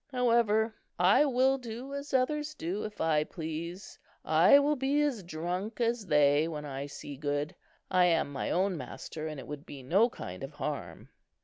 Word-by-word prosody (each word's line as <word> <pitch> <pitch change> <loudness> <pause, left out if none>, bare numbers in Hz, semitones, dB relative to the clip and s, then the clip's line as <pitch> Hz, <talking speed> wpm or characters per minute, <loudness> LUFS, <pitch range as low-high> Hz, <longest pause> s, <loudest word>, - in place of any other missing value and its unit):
However, 230 -3 +2 0.2
I 185 +11 +5
will 265 0 +3
do 245 +3 -7
as 280 +1 -5
others 295 +3 0
do, 185 - -3
if 210 -1 -8
I 155 -2 +2
please. 165 +4 -6 0.3
I 280 - +7
will 290 +1 +3
be 275 +2 +1
as 270 -8 0
drunk 180 +6 -4
as 230 -3 0
they, 150 0 +4
when 150 -2 -5
I 140 0 -5
see 145 0 -8
good. 145 +1 -2 0.4
I 180 -1 +5
am 165 -4 +2
my 135 - -2
own 190 +1 +1
master, 155 +4 -6
and 155 -2 -6
it - - -8
would 145 -1 -7
be 135 -2 -10
no 195 - +4
kind 90 - -8
of 135 +2 -6
harm." 140 - -5
180 Hz, 180 wpm, -30 LUFS, 150-245 Hz, 0.4 s, I